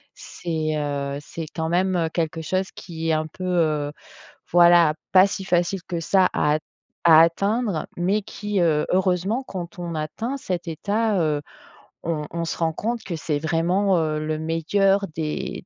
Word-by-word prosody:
C'est, 160 -2 -3
heu, 140 -1 -2
c'est 165 +2 -7
quand 160 -1 -2
même 175 -1 +1
quelque 165 -1 -1
chose 185 +4 -1
qui 165 -2 -5
est - - +3
un 155 0 0
peu, 185 +4 -8
heu, 155 -5 +1 0.6
voilà 175 -2 +6 0.2
pas 185 0 +8
si 195 -1 -5
facile 175 +1 +1
que 170 -1 -4
ça 190 +3 +3
à 150 0 +2
at - - -1 0.5
à 160 -1 +9
atteindre 200 +2 +1
mais 190 +5 +1
qui, 205 0 -3
heu, 155 -3 +2
heureusement 190 +5 +1
quand 180 -6 -7
on 170 -1 -4
atteint 220 - -3
cet 180 -8 -4
état, 205 +6 0
heu, 150 -2 0 0.6
on 155 -2 -2
on 170 0 -2
se - - -4
rend 165 -1 +1
compte 230 +7 -3
que 175 - -4
c'est 155 -2 -2
vraiment, 175 +5 +1
heu, 155 -1 0
le 155 0 -2
meilleur 195 +5 +1
des 155 +2 -4
170 Hz, 170 wpm, -23 LUFS, 155-190 Hz, 0.6 s, à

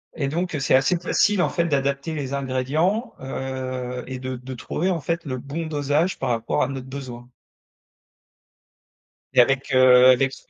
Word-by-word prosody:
et 145 -4 -1
donc, 170 +5 -2
heu, - - -1
c'est 135 - +3
assez 135 +7 +3
facile, 190 +3 +2
en - - +2
fait, 170 - 0
d'adapter 140 0 -1
les 140 -3 -4
ingrédients, 140 - -1
heu, 130 -1 -5
et 130 -1 -5
de 130 0 -4
de 125 +1 -8
trouver, 170 +8 -2
en 170 -3 -2
fait, 170 +3 -2
le 130 -3 -3
bon 145 +6 -5
dosage 150 +3 0
par 135 - -2
rapport 115 -1 0
à - - 0
notre 135 -2 -6
besoin 125 -3 -8 2.0
et - - +7
avec, 135 +2 +1
heu, 130 -1 +7
avec 135 +1 +2
cet - - -14
135 Hz, 175 wpm, -23 LUFS, 130-155 Hz, 2.0 s, et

